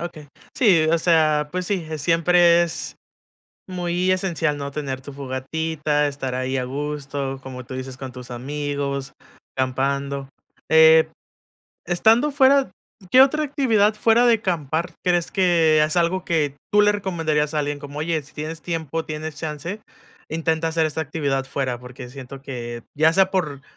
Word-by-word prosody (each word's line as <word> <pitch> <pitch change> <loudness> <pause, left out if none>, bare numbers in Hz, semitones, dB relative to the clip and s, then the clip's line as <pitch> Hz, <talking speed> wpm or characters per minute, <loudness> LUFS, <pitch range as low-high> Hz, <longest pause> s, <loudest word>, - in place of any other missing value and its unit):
Okey, 170 -3 -7 0.3
sí, 190 - +4
o 165 - +4
sea, 155 -3 +2
pues 185 0 -2
sí, 185 -5 -2
es 155 -1 -4
siempre 170 +2 +4
es 170 - -4 0.7
muy 180 0 0
esencial, 170 -5 0
¿no?, 140 0 -5
tener 140 -2 -4
tu 140 +1 -10
fogatita, 150 +3 -2
estar 135 -3 -3
ahí 130 +1 -2
a 130 - -1
gusto, 140 0 -4
como 130 -1 -8
tú 130 - -8
dices, 130 0 -6
con 130 -1 -8
tus 125 -1 -10
amigos, 140 +1 -4 0.4
acampando, 135 +1 -1 0.4
eh, 160 0 +7 0.8
estando 225 - +3
fuera, 275 0 +4 0.4
¿qué 255 - +8
otra 305 +3 +4
actividad, 230 -8 +2
fuera 225 +3 +3
de 230 -3 +4
acampar, 165 -2 -2
crees 175 -1 +2
que 165 -5 +3
es 155 +2 -1
algo 175 +2 +1
que 150 -5 0 0.2
tú 210 - +6
le 210 - +5
recomendarías 165 -7 -1
a 155 - +1
alguien?, 145 0 -2
como: 145 +1 -8
“Oye, 160 0 0
si 140 - -17
tienes 155 +1 -6
tiempo, 165 -2 -3
tienes 155 0 -5
chance, 160 +6 -5 0.5
intenta 160 0 -1
hacer 160 -1 +1
esta 155 +1 -3
actividad 140 -3 -2
fuera”, 135 -2 -2
porque 125 0 -10
siento 135 +1 -10
que, 120 -3 -6 0.2
ya 160 +2 +4
sea 190 +1 +4
por, 155 -8 -2
155 Hz, 160 wpm, -22 LUFS, 140-175 Hz, 0.8 s, qué